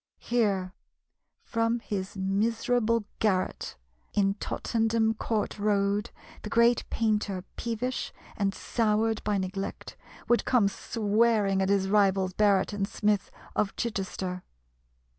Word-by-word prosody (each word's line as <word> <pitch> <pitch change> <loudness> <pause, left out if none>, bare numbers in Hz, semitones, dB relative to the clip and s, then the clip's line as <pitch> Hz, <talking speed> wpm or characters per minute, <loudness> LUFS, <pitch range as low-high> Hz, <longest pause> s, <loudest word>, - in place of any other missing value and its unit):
Here, 200 -6 0 0.7
from 230 0 0
his 195 -3 -4
miserable 225 +3 +1
garret 185 - 0 0.4
in 195 -1 +2
Tottenham 225 -1 0
Court 215 -1 -2
Road, 205 0 +1 0.3
the 210 - -6
great 235 +1 +3
painter, 210 -4 0
peevish 240 +2 -3 0.2
and 200 -1 +1
soured 220 -1 0
by 210 -1 +1
neglect, 190 +1 -4 0.3
would 240 - +3
come 240 -6 +3
swearing 210 -1 +1
at 190 - +1
his 195 -1 +2
rivals 195 -2 +3
Barret 205 0 +3
and 195 -1 -1
Smith 210 -1 0 0.3
of 195 - 0
Chichester. 190 -4 -3
210 Hz, 110 wpm, -28 LUFS, 195-225 Hz, 0.7 s, great